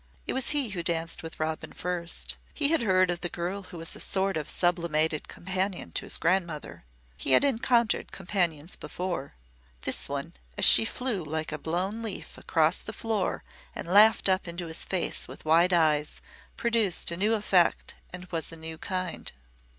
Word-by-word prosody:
It - - -2
was 265 0 +1
he 285 -5 +2
who 185 -3 -4
danced 165 -1 0
with 160 0 -9
Robin 155 0 -3
first. 175 -1 -2 0.2
He 290 -2 +3
had 325 -4 +2
heard 185 -4 +3
of 175 - -4
the 175 - -2
girl 175 +4 -4
who 180 -2 -11
was 165 0 -4
a - - -9
sort 195 0 0
of 155 -2 -4
sublimated 165 -3 +1
companion 190 +1 -3
to - - -3
his - - +4
grandmother. 170 - -1 0.3
He 130 - 0
had - - +6
encountered 240 -3 +1
companions 175 -4 -2
before. 175 -7 -5 0.5
This - - +1
one, - - -4 0.2
as - - +6
she - - +9
flew 230 -6 -2
like 155 +1 -3
a 150 - -4
blown 185 +8 -2
leaf 225 -3 -5
across - - +2
the - - -7
floor 220 -4 -2 0.3
and - - -5
laughed 210 +5 +6
up 185 -1 +1
into 170 +1 -5
his 160 0 0
face 185 -3 -2
with - - -11
wide 165 +3 +4
eyes 155 -3 +2 0.4
produced 225 -8 +2
a - - -1
new 210 +4 +2
effect 190 -5 +2 0.2
and 180 0 -8
was 165 -3 -3
a 165 - -5
new 160 0 -7
kind. 185 -2 -4
180 Hz, 180 wpm, -27 LUFS, 165-200 Hz, 0.5 s, she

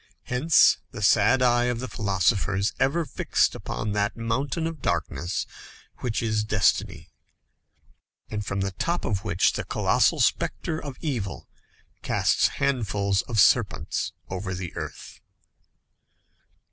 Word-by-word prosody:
Hence 140 +6 +4
the 110 -5 -7
sad 120 +6 +4
eye 120 -1 +3
of 125 -1 -1
the 130 - -4
philosophers 100 -1 0
ever 140 +6 +1
fixed - - +1
upon 105 - -4
that 105 +1 -1
mountain 130 +7 -1
of 165 -3 -5
darkness 85 - -2 0.5
which 120 -2 -2
is 110 -1 0
destiny, 110 -2 0 1.2
and 105 -1 -4
from 95 -1 -3
the 95 0 -1
top 170 - -2
of 100 -2 -1
which 95 -4 +2
the - - -3
colossal - - +2
spectre 160 -1 0
of 140 -3 -7
evil 120 - -4 0.5
casts - - +2
handfuls 105 -8 0
of 115 -3 0
serpents - - +2 0.2
over 95 0 -4
the 90 -1 -6
earth. - - -7
110 Hz, 125 wpm, -25 LUFS, 100-130 Hz, 1.2 s, Hence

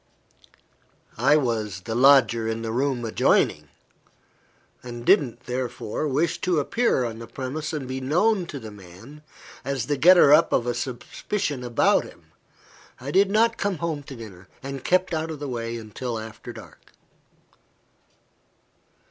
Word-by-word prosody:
I 150 - +5
was 110 - -2
the 110 - -5
"lodger 120 -3 +5
in 115 0 -3
the 110 - -3
room 130 0 -1
adjoining," 75 -8 +1 1.1
and 120 -1 -8
didn't, 120 -5 +3
therefore, 125 +2 -4
wish 160 +5 0
to 180 -4 +1
appear 150 - +1
on 115 -1 -5
the 115 - -9
premises 135 +6 -5
and 145 -4 -4
be 130 +1 -4
known 180 +8 +2
by 150 - -7
the 110 -5 -9
man, 105 +9 -14 0.4
as 135 -3 -2
the 145 +3 -1
getter 175 -2 +7
up 160 +2 +5
of 120 - +2
a 120 - 0
suspicion 130 - -4
against 120 -1 +2
him. - - -16 0.7
I 135 +3 -6
did 195 +4 +4
not 225 +2 +2
come 200 -3 -1
home 160 -2 -3
to 135 - -9
dinner, 95 -6 -11 0.2
and 135 -1 -6
kept 185 0 +1
out 160 0 -2
of 160 - -5
the 145 - -5
way 115 -2 -4 0.2
till 125 -3 -4
after 110 0 -8
dark. - - -14
130 Hz, 150 wpm, -24 LUFS, 115-155 Hz, 1.1 s, getter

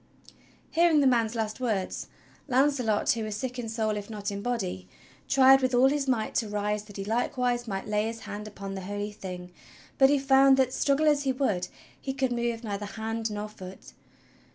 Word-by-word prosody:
Hearing 335 -2 +4
the 285 - +3
man's 235 -3 +2
last 220 0 -2
words, 215 -7 -2 0.4
Launcelot, 255 -5 +2
who 230 -2 -1
was 215 -1 -4
sick 250 +2 -4
in 230 -2 -4
soul 220 -1 -1
if 205 0 -6
not 205 -1 -4
in 200 0 -4
body, 195 - -3 0.4
tried 270 0 +6
with 255 -1 +1
all 260 +2 +6
his 285 -1 -1
might 235 -4 0
to 220 - 0
rise 210 0 -2
that 205 -1 -12
he 195 - -4
likewise 245 +2 0
might 195 -2 -3
lay 210 +1 0
his 230 0 -6
hand 210 0 -7
upon 200 -2 -7
the 190 - -5
Holy 205 +2 -4
Thing; 180 -3 -8 0.5
but 270 0 +7
he 290 - +4
found 270 0 +5
that, 260 -1 +2
struggle 285 +2 +2
as 295 -1 +4
he 270 -2 +1
would, 215 -10 0 0.3
he 270 - -3
could 260 -1 0
move 235 -1 -2
neither 205 -2 -4
hand 225 +1 -3
nor 210 0 -4
foot. 190 -3 -11
225 Hz, 200 wpm, -28 LUFS, 205-260 Hz, 0.5 s, but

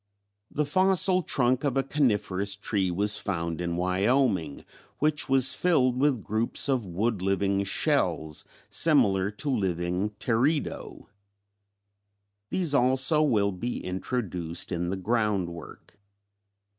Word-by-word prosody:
The 150 - -1
fossil 185 +3 +3
trunk 130 -4 +1
of 140 -2 0
a 135 - +2
coniferous 105 -8 0
tree 100 -2 -1
was 100 +4 0
found 85 -4 -3
in 85 -1 -2
Wyoming, 95 - 0 0.3
which 150 -1 0
was 135 -1 +3
filled 130 -9 +2
with 130 -4 +1
groups 110 +6 -1
of 130 -7 0
wood 100 +3 -2
living 100 +1 0
shells 80 -5 0 0.2
similar 100 - +2
to 140 +8 -3
the 130 - +1
living 90 0 -1
Teredo. 135 +6 -1 1.4
These 175 -6 0
also 135 +3 +4
will 105 -9 +2
be 115 +7 -5
introduced 90 -4 -3
in 85 0 -2
the 95 - -3
ground 105 -2 0
work. 85 +4 -12
105 Hz, 120 wpm, -27 LUFS, 95-135 Hz, 1.4 s, also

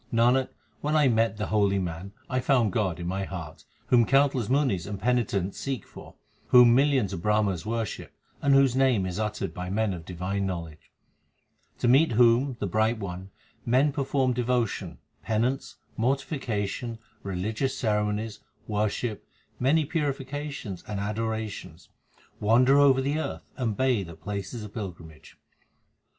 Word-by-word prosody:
Nanak, 125 +3 +3 0.3
when 150 +1 -1
I 150 -3 +5
met 115 -2 +2
the 105 - -2
holy 100 -2 +3
man, 90 +1 -4 0.2
I 130 - 0
found 125 -6 +2
God 95 -6 0
in 85 - -5
my 95 +2 -2
heart, 85 -5 -7 0.2
Whom 120 -3 +5
countless 135 -4 +3
munis 130 - +1
and 100 -1 -5
penitents 100 -5 0
seek 135 -3 -3
for, - - -13 0.3
Whom 125 -1 +7
millions 130 -6 +3
of 85 - -4
Brahmas 105 -3 +1
worship, 115 -3 -3 0.3
and 140 -1 +4
whose 135 -2 +4
name 130 -7 +3
is 95 +2 -4
uttered 105 -1 -2
by 90 0 -5
men 105 +1 0
of 85 -2 -7
divine 95 +3 -3
knowledge; 85 -4 -6 0.9
To - - 0
meet 135 +3 +5
whom, 120 +3 +4
the - - -1
Bright 110 +4 +1
One, 95 -2 -6 0.3
men 130 +5 +3
perform 135 -2 0
devotion, 120 -2 -1 0.2
penance, 120 +5 -1 0.2
mortification, 120 -4 -2 0.2
religious 110 +8 -2
ceremonies, 105 -1 -1 0.3
worship, 105 +1 -2 0.3
many 145 +5 +3
purifications 140 - -4
and 105 -2 -3
adorations, 105 -4 -4 0.5
Wander 125 +6 +5
over 135 -2 +5
the 145 +3 0
earth, - - -4
and 115 -6 -2
bathe 125 -9 +1
at 80 - -12
places 105 +3 -5
of 105 -1 -9
pilgrimage. 85 -7 -9
110 Hz, 145 wpm, -27 LUFS, 100-130 Hz, 0.9 s, Whom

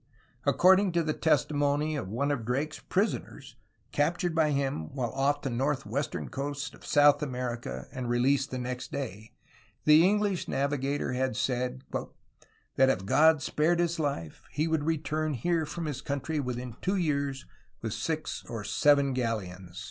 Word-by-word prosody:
According 190 0 +5
to 170 -1 +2
the 155 -1 0
testimony 150 0 +1
of 140 - -3
one 130 +8 -1
of 135 -5 -1
Drake's 135 +7 -2
prisoners, 200 +4 -2 0.4
captured 175 -4 +1
by 160 -1 +3
him 135 - -1
while 120 -4 -1
off 140 +3 0
the 135 - -2
northwestern 135 +1 -1
coast 145 +1 -4
of - - -16
South 145 0 +5
America 125 -4 -4
and 130 -3 -4
released 135 +3 +2
the 130 - -4
next 125 0 -4
day, 110 -5 -6 0.5
the 155 +2 +7
English 205 -1 +2
navigator 140 0 -1
had 130 -2 0
said 125 +2 -1 0.9
"that 135 0 +6
if 95 -7 0
God 155 +6 +5
spared 160 +3 +2
his 170 -1 0
life 140 - -3
he 155 +2 -1
would 160 -2 0
return 155 -1 -1
here 160 +5 0
from 170 +2 -4
his 145 -4 -4
coun 140 -2 -2
try 155 +3 -2
within 125 -3 -4
two 190 +2 0
years 140 -6 -1 0.4
with 110 -2 -2
six 155 -1 -3
or 115 -3 -4
seven 140 +6 +3
galleons." 95 -8 -3
140 Hz, 155 wpm, -29 LUFS, 125-155 Hz, 0.9 s, the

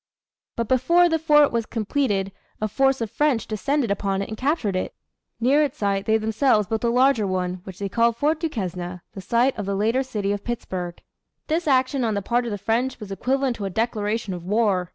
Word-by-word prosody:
But 230 -1 -2
before 340 +9 +4
the 325 -1 +1
fort 295 -2 +5
was 230 -1 -1
completed 215 -4 -1 0.3
a 215 - 0
force 270 +4 +1
of 225 -3 -3
French 295 -6 +1
descended 255 +2 -1
upon 195 -1 -1
it - - -8
and 215 - -4
captured 255 - 0
it. 185 - -3 0.4
Near 265 +6 +4
its 295 -1 -1
site 200 -1 -1
they 220 0 +4
themselves 220 0 +2
built 220 +1 -2
a 235 - +2
larger 250 -3 +3
one, 180 -1 -2
which 190 -2 -9
they 200 - -3
called 230 +3 +2
Fort 300 +4 +1
Duquesne 180 - -4
the 195 - -7
site 240 +7 +2
of 205 - -4
the 200 - -1
later 225 +6 +1
city 210 -6 -2
of 205 0 -3
Pittsburgh. 185 -7 -4 0.5
This 320 +1 -1
action 260 -1 +2
on 220 -3 0
the 200 - -2
part 240 +4 0
of 235 - -3
the 205 - -2
French 230 +6 -1
was 210 -3 -8
equivalent 260 +4 0
to 205 - -4
a - - -2
declaration 215 0 -1
of 175 -1 -7
war. 195 -2 +1
225 Hz, 215 wpm, -23 LUFS, 200-265 Hz, 0.5 s, fort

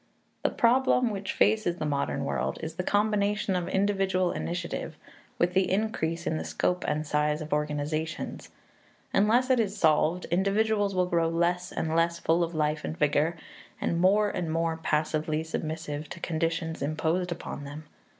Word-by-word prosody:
The - - +2
problem 250 0 +3
which 200 -1 -3
faces 210 -5 +2
the 160 - -4
modern 140 -2 -1
world 65 - -1
is 160 0 -4
the 170 - -3
combination 205 -1 +1
of 175 -1 -1
individual 190 -2 +1
initiative 170 -2 -4 0.4
with 175 +1 +1
the 190 -1 +2
increase 180 -5 -1
in - - 0
the 80 - -3
scope 80 - -1
and 150 +1 0
size 150 0 +1
of 155 -1 -4
organizations. 150 +2 -2 0.6
Unless 240 +6 +3
it 255 - +4
is 210 -2 0
solved, 160 +1 +3
individuals 200 +2 +2
will 180 0 +3
grow 170 -2 +1
less 175 +2 0
and 160 0 -2
less 170 0 +2
full 170 +1 +2
of 170 0 -3
life 150 0 0
and 160 - -4
vigor, 150 +3 +2 0.4
and 170 0 0
more 205 +3 +4
and 165 -3 -3
more 165 0 0
passively 155 0 0
submissive 155 -2 -4
to - - -8
conditions 165 -1 -2
imposed 160 +5 0
upon 165 -4 -5
them. 145 +2 -8
170 Hz, 160 wpm, -28 LUFS, 155-195 Hz, 0.6 s, it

